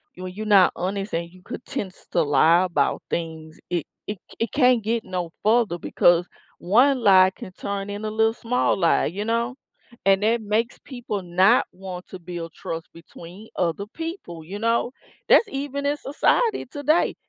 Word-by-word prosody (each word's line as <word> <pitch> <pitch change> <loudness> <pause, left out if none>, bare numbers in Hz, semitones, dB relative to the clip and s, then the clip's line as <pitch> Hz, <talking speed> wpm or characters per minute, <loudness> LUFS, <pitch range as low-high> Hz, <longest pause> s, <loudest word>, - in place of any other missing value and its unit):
When 185 0 -7
you're 215 +3 -6
not 195 -4 +5
honest 195 +2 -3
and 170 0 -2
you 185 +1 -18
could - - -8
tends 190 -2 -6
to 170 - +2
lie 160 +5 +4
about 180 - 0
things, 160 -1 -5
it 175 -3 -1 0.2
it 210 -1 -4 0.2
it 230 - -1
can't 250 -5 +3
get 230 +2 -1
no 180 -3 -4
further 220 -4 +3
because 175 +1 +3 0.3
1 250 +8 +4
lie 190 -3 +6
can 185 - -9
turn 200 0 -4
in 205 +1 -5
a 215 - -2
little 220 +1 +2
small 240 +2 0
lie, 170 -3 +3
you 200 +6 -3
know, 235 +3 -1 0.5
and 195 0 +4
that 230 +2 +2
makes 220 +3 -1
people 240 -6 -5
not 185 +7 +4
want 185 -1 -8
to 185 - -9
build 170 -1 -7
trust 165 +1 -6
between 170 +5 -12
other 180 +3 -1
people, 325 - -6
you 195 +6 -7
know? 230 +2 +1 0.4
That's 455 - +6
even 280 +1 -4
in 290 +1 +1
society 395 - +1
today. 290 +5 +1
200 Hz, 175 wpm, -23 LUFS, 175-235 Hz, 0.5 s, lie